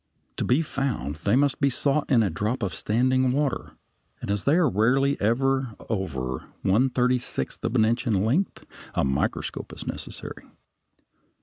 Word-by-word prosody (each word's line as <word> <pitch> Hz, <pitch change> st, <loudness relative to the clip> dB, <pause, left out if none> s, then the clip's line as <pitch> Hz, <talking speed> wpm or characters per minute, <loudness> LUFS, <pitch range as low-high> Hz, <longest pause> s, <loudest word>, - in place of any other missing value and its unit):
To -, -, -1 dB
be 135 Hz, +7 st, +2 dB
found 130 Hz, -, -2 dB
they 100 Hz, +7 st, +1 dB
must 140 Hz, +1 st, +2 dB
be 140 Hz, -, +4 dB
sought 140 Hz, +3 st, 0 dB
in 120 Hz, -4 st, +5 dB
a 100 Hz, -, 0 dB
drop 105 Hz, +9 st, -2 dB
of 95 Hz, -4 st, -1 dB
standing 130 Hz, +6 st, +2 dB
water, 140 Hz, -1 st, -1 dB, 0.5 s
and -, -, -4 dB
as 100 Hz, -2 st, -1 dB
they 145 Hz, -, +4 dB
are 175 Hz, -3 st, +4 dB
rarely 130 Hz, +7 st, +2 dB
ever 130 Hz, +2 st, +1 dB
over 65 Hz, -, -3 dB, 0.2 s
one 115 Hz, +8 st, +3 dB
thirty 125 Hz, 0 st, +2 dB
sixth -, -, -5 dB
of 115 Hz, -, -1 dB
an 110 Hz, -3 st, +5 dB
inch 120 Hz, +2 st, 0 dB
in 100 Hz, -4 st, +2 dB
length, 145 Hz, -, 0 dB, 0.3 s
a -, -, +2 dB
microscope 65 Hz, 0 st, -2 dB
is -, -, -8 dB
necessary. -, -, -7 dB
125 Hz, 170 wpm, -25 LUFS, 100-135 Hz, 0.5 s, in